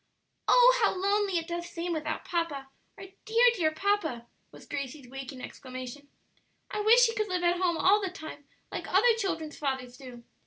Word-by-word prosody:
"Oh, - - +7
how - - +3
lonely 400 -1 +1
it 330 -1 -3
does 345 0 -4
seem 340 +1 -3
without 310 -1 -3
papa! 310 -6 -3 0.3
our - - -9 0.2
dear, 460 +2 +4
dear 340 -8 +1
papa!" 315 - -1 0.3
was - - -14
Gracie's 275 -1 -6
waking 265 0 -8
exclamation. 255 +2 -8 0.6
"I - - -3
wish 470 +4 +6
he 455 - 0
could 430 -2 -1
live 365 -2 -2
at 350 +1 +2
home 345 -2 +1
all 405 +5 +4
the 385 - -2
time 315 -5 -10 0.3
like - - -5
other 460 +6 +5
children's 325 -8 -3
fathers 265 -3 -3
do! 250 -3 -11
340 Hz, 180 wpm, -29 LUFS, 275-400 Hz, 0.6 s, Oh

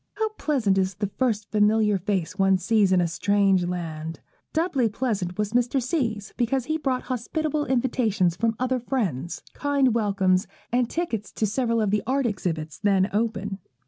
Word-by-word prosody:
How 440 +1 0
pleasant 260 - +1
is 190 0 0
the 205 -1 -3
first 220 -5 0
familiar 210 -1 +3
face 185 -2 -2
one 195 0 +4
sees 205 0 +2
in 185 - +4
a 175 - +1
strange 195 +1 +2
land! 165 -3 -4 0.3
Doubly 305 -8 +1
pleasant 205 -6 -2
was 210 0 -1
Mr. 245 +2 +2
C.'s, 240 -6 -2
because 245 +1 0
he 315 +2 -1
brought 265 -4 -1
hospitable 295 +4 -2
invitations 230 -8 +1
from 225 +3 0
other 255 0 0
friends, 195 - -2
kind 280 -4 +2
welcomes, 195 -3 +2 0.2
and 245 0 +1
tickets 240 - -3
to 220 - 0
several 230 +2 0
of 210 -3 +1
the 210 0 +2
art 270 +1 +1
exhibitions 165 -8 -3
then 195 -1 +2
open. 210 -2 -1
215 Hz, 165 wpm, -25 LUFS, 195-255 Hz, 0.3 s, one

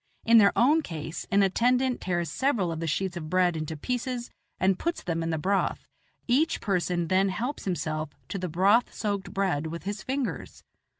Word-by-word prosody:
In 230 0 +7
their 200 -2 +6
own 295 +7 +5
case, 160 - -6
an 200 0 +4
attendant 250 +6 +2
tears 175 -2 -1
several 235 -11 +1
of 160 - -4
the 165 - -3
sheets 180 +4 -1
of 155 -2 -6
bread 180 -1 +2
into 155 0 -4
pieces 245 - -3 0.3
and 185 0 +2
puts 340 0 -2
them 165 -2 -2
in 165 - -2
the 160 - 0
broth; 195 +6 0 0.4
each 300 +7 +2
person 180 -4 0
then 190 +3 +3
helps 240 +10 -3
himself 155 -4 -2 0.2
to 195 - -3
the 180 -1 -3
broth 195 +9 +3
soaked 200 -3 -3
bread 180 -6 0
with 170 +1 -6
his 205 +1 -4
fingers. 265 +2 -4
190 Hz, 185 wpm, -27 LUFS, 170-235 Hz, 0.4 s, In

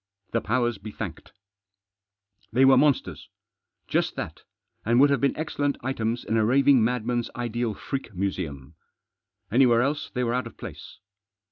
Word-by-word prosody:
The 115 - 0
powers 120 -1 0
be 105 +2 -8
thanked! - - -7 1.2
They 130 +4 +4
were 135 0 +7
monsters; 140 +1 +1 0.6
just - - 0
that, - - -6 0.4
and 120 +2 +3
would 140 +1 +6
have 140 - +1
been 140 - +1
excellent 145 -2 -1
items 120 -2 -2
in 115 - 0
a 110 - +3
raving 135 +1 +4
madman's 120 0 -1
ideal 120 -2 -2
freak 135 -4 -5
museum. 80 -7 -4 0.8
Anywhere 120 0 +5
else 145 +3 -2
they 125 - -1
were 120 -1 0
out 125 +1 -1
of - - -14
place. - - -9
120 Hz, 150 wpm, -26 LUFS, 110-135 Hz, 1.2 s, were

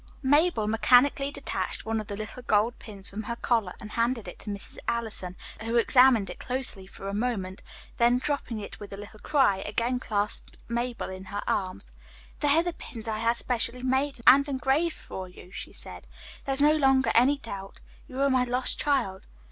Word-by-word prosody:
Mabel 290 -3 +3
mechanically 255 +6 +4
detached 285 - -2
one 225 0 -1
of 210 - -10
the 200 - -5
little 215 +4 -6
gold 220 0 +1
pins 200 -3 -10
from 205 +2 -5
her 235 +2 -4
collar 225 -6 0
and 215 - -9
handed 230 -2 0
it 180 - -9
to - - -7
Mrs. 200 -1 -6
Allison, 220 -6 -2 0.3
who 230 +1 -2
examined 240 -2 +5
it - - -10
closely 250 -7 -3
for 195 - -10
a 195 - -3
moment, 200 -4 -2 0.4
then 240 +1 +4
dropping 255 -4 -2
it 205 - -8
with 205 - -9
a 195 - -6
little 210 +1 -10
cry, 265 -9 +3
again 240 +5 -1
clasped 210 -4 -1
Mabel 240 -3 -2
in 190 0 -8
her 205 0 -4
arms. 185 - -2 0.5
"They 295 - +1
are 330 - +4
the 350 -1 -2
pins 230 -7 -8
I 215 -1 -2
had 230 +1 +2
specially 245 +1 -1
made 265 +1 0
and 280 +2 +7
engraved 275 +5 +1
for 185 -1 -7
you," 180 0 -14
she - - -7
said. - - -4 0.4
"There 275 - 0
is 270 - +2
no 300 +1 +6
longer 270 -3 +4
any 265 +5 +5
doubt. 200 -7 -8 0.3
You 260 +1 -4
are 280 - +4
my 255 -1 +4
lost 250 +1 -1
child." 245 -10 0
235 Hz, 195 wpm, -27 LUFS, 205-265 Hz, 0.5 s, and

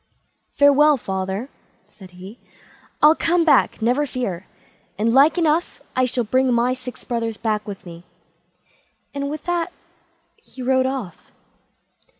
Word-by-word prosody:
"Farewell, 285 +1 +5
father", 190 +1 -4 0.4
said 190 -3 -15
he; 195 +6 -11 0.6
"I'll 300 +1 +8
come 335 +1 +1
back, 300 -7 +3
never 255 +6 +1
fear, 200 -9 -4 0.5
and 225 +3 +1
like 280 +6 +5
enough 330 0 0 0.2
I 255 0 +3
shall 250 0 -1
bring 255 +4 +1
my 240 +1 +2
six 255 -1 -9
brothers 230 -3 -3
back 215 -2 -2
with 200 -2 -8
me"; 170 -1 -11 1.1
and 280 0 -3
with 300 0 -6
that 350 0 -2 0.7
he 260 - -11
rode 260 0 +2
off. 255 -10 -6
255 Hz, 135 wpm, -21 LUFS, 215-285 Hz, 1.1 s, I'll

